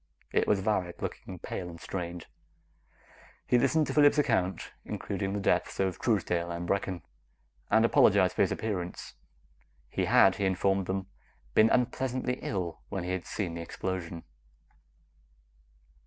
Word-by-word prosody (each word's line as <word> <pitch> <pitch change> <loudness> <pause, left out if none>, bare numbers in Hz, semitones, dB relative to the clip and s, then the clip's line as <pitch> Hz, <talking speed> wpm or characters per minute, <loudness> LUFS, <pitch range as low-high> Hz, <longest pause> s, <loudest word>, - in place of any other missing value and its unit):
It - - +2
was 100 -2 +3
Varret, 95 -4 -1
looking 95 - -5
pale 90 +1 -5
and 85 -1 -10
strained. 85 +1 -5 1.2
He 125 - +3
listened 150 +5 +3
to - - -3
Phillips' 145 0 +5
account, 110 -10 +1
including 95 0 -3
the 100 - -1
deaths 100 - 0
of 95 -3 0
Truesdale 90 -6 0
and 85 0 -4
Brecken, 95 -4 -1 0.7
and - - +5
apologized - - +5
for - - +1
his - - +3
appearance. 90 -5 -4 0.8
He - - -1
had, 95 +1 +5
he 100 - 0
informed 95 0 +1
them, 95 0 -2 0.5
been 110 - +6
unpleasantly 125 0 0
ill 90 -4 -3
when 95 -3 -3
he 90 - -3
had 95 -1 -3
seen 90 -6 -3
the 85 - -5
explosion. 85 -1 -4
95 Hz, 140 wpm, -29 LUFS, 90-110 Hz, 1.2 s, been